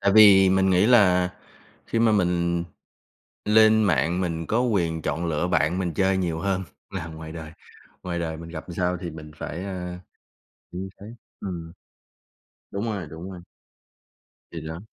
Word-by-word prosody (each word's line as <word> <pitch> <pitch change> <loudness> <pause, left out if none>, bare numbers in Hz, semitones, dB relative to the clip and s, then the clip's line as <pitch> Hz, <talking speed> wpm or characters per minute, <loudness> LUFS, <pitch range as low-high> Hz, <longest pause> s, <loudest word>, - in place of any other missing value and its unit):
Tại 100 0 +3
vì 100 -2 +8
mình 95 0 +3
nghĩ 95 +2 +4
là 90 -7 +5 0.6
khi 115 - -1
mà 115 -1 +4
mình 85 -3 +1 0.8
lên 110 +1 +6
mạng 85 0 +2
mình 85 -2 -2
có 115 +3 +2
quyền 85 -9 0
chọn 80 +3 -2
lựa 80 +1 0
bạn 85 +1 +1
mình 90 -3 -2
chơi 95 +3 +2
nhiều 85 -3 -1
hơn 95 +1 -1 0.3
là 80 - -5
ngoài 80 -1 -8
đời, 80 -1 -8 0.5
ngoài 85 -1 -3
đời 80 -1 -3
mình 85 +1 -9
gặp 80 0 -7
làm 85 - -8
sao 90 +1 0
thì 85 -1 -6
mình 75 -1 -10
phải, 85 +5 -5
a, 90 -2 -5 0.7
như 95 +2 -5
thế - - -9 0.3
ừm. 85 -3 -6 1.0
Đúng 100 +3 -3
rồi, 100 -7 -3
đúng 85 +4 -8
rồi. 90 -2 -9 1.1
Thì 85 - -6
đó. 80 +3 -7
90 Hz, 170 wpm, -25 LUFS, 80-95 Hz, 1.1 s, vì